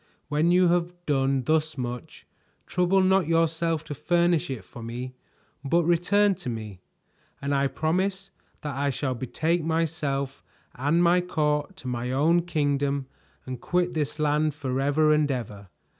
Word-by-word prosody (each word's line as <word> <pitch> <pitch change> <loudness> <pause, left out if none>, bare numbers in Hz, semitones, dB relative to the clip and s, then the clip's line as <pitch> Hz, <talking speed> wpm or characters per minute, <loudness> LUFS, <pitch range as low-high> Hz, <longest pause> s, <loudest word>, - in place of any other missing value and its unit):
When 150 +3 +2
you 180 0 +5
have 175 0 +1
done 135 -2 +1
thus 155 +2 +1
much, 125 -1 -6 0.4
trouble 180 +2 +2
not 190 -3 +3
yourself 165 -1 +1
to 150 - -6
furnish 170 +1 +1
it 130 -7 -5
for 120 - -11
me, 120 +3 -6 0.5
but 170 +5 +2
return 195 +5 +3
to 125 - -4
me, 110 -5 -6 0.6
and 140 +1 -2
I 140 0 +2
promise 190 +6 -1 0.3
that 145 -3 -4
I 140 +1 0
shall 135 0 -1
betake 160 +7 -1
myself 150 -4 -1 0.3
and 150 +7 +1
my 175 +1 +4
court 150 -1 -1
to 160 - -9
my 125 0 -2
own 160 +6 +3
kingdom 140 -3 0 0.4
and 130 -2 -6
quit 180 +2 0
this 150 -2 -2
land 150 0 +1
forever 145 +2 +2
and 150 -1 +2
ever. 105 -6 -4
150 Hz, 150 wpm, -26 LUFS, 135-170 Hz, 0.6 s, you